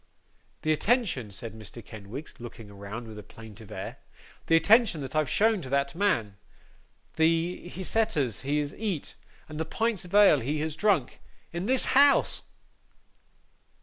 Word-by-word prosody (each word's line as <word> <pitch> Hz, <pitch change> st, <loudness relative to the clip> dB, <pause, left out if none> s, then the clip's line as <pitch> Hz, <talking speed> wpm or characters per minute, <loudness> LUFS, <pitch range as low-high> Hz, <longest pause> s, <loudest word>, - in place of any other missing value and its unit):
'The 155 Hz, -, +2 dB
attention,' 175 Hz, -, +1 dB
said 105 Hz, +3 st, -7 dB
Mr. 110 Hz, +1 st, -10 dB
Kenwigs, 110 Hz, +7 st, -9 dB
looking 115 Hz, -3 st, -10 dB
around 100 Hz, +4 st, -7 dB
with 110 Hz, -1 st, -9 dB
a -, -, -7 dB
plaintive 110 Hz, -1 st, -13 dB
air, -, -, -6 dB, 0.5 s
'the 165 Hz, -, +5 dB
attention 205 Hz, +1 st, +5 dB
that 135 Hz, +3 st, -6 dB
I've 155 Hz, -3 st, +2 dB
shown 220 Hz, -2 st, +3 dB
to 130 Hz, -, -8 dB
that 140 Hz, 0 st, 0 dB
man! 115 Hz, -, 0 dB, 0.8 s
The 165 Hz, +2 st, +1 dB
hyseters 180 Hz, -, 0 dB
he 140 Hz, +3 st, 0 dB
has 145 Hz, -1 st, -2 dB
eat, 200 Hz, -8 st, -3 dB, 0.3 s
and 155 Hz, 0 st, -7 dB
the -, -, +1 dB
pints 225 Hz, +4 st, -1 dB
of 180 Hz, +2 st, -6 dB
ale 205 Hz, -8 st, +7 dB
he 145 Hz, +6 st, -2 dB
has 155 Hz, -1 st, -2 dB
drank, 180 Hz, -8 st, +1 dB, 0.3 s
in 175 Hz, +4 st, -3 dB
this 260 Hz, +1 st, +3 dB
house 280 Hz, +1 st, +5 dB
155 Hz, 150 wpm, -28 LUFS, 120-200 Hz, 0.8 s, ale